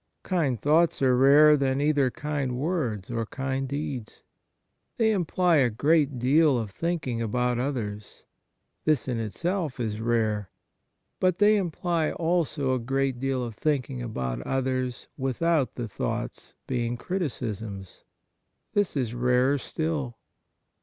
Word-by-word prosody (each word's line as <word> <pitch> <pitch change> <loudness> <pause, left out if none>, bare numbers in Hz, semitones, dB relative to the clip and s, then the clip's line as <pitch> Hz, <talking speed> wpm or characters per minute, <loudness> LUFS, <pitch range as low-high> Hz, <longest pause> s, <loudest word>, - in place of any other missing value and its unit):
Kind 150 - 0
thoughts 160 +3 +3
are 130 -1 +4
rarer 145 +4 +7
than 135 -1 0
either 145 -2 +2
kind 140 -2 -3
words 125 - -2
or 115 -1 -2
kind 135 +1 -3
deeds. 140 -5 -5 0.7
They 220 -2 +3
imply 180 -3 +2
a^ 120 -6 +2
great 145 -1 +3
deal 140 +3 +4
of 110 -4 -3
thinking 150 - -2
about 125 +2 0
others. 110 -6 -4 0.6
This 155 -5 +1
in 120 -3 -1
itself 160 - -2
is 110 -2 -2
rare. 110 -4 0 0.7
But 185 -1 +2
they 210 +1 +5
imply 170 -4 0
also 160 -5 0
a 130 - 0
great 135 +1 -1
deal 135 -1 -1
of 120 -2 -5
thinking 135 0 -1
about 65 - -3
others 130 - -2
without 140 +2 0
the 120 -2 -4
thoughts 80 - -4
being 120 -2 -2
criticisms. 110 - -4 0.7
This 205 -7 +1
is 120 -4 -1
rarer 125 +3 +2
still. 145 -6 -3
135 Hz, 130 wpm, -26 LUFS, 120-155 Hz, 0.7 s, rarer